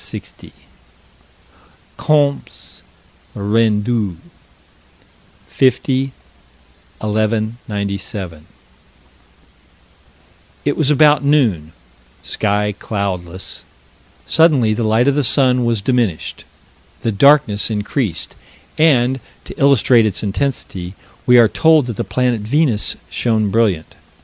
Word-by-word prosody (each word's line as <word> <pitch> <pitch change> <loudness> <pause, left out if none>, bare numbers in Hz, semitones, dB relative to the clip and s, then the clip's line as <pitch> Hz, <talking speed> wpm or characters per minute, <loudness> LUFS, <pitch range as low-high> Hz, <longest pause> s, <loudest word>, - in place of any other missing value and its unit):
Comptes 145 -2 -1 0.5
Rendus, 105 -1 0 1.3
50 130 +1 +1 0.9
1197: 105 -5 -3 2.2
It 145 - +1
was 155 -3 0
about 150 0 +4
noon 115 - +1 0.5
sky 105 0 -1
cloudless 95 -3 -5 0.6
suddenly 145 -10 +3
the 115 - -2
light 110 +4 +2
of 140 - +3
the 145 +1 0
sun 125 -1 +3
was 115 -4 -1
diminished. 120 -10 -2 0.6
The 115 - -1
darkness 115 -2 +3
increased, 105 - -3 0.4
and, 130 -4 +3 0.3
to - - -11
illustrate 125 -4 +4
its 105 - -2
intensity, 100 -5 -3 0.3
we 125 0 +6
are 115 -2 +7
told 160 +4 +3
that 120 -4 -6
the - - -2
planet 125 -3 -1
Venus 120 -1 0 0.2
shone 110 -4 0
brilliant. 100 -8 0
115 Hz, 85 wpm, -17 LUFS, 105-135 Hz, 2.2 s, are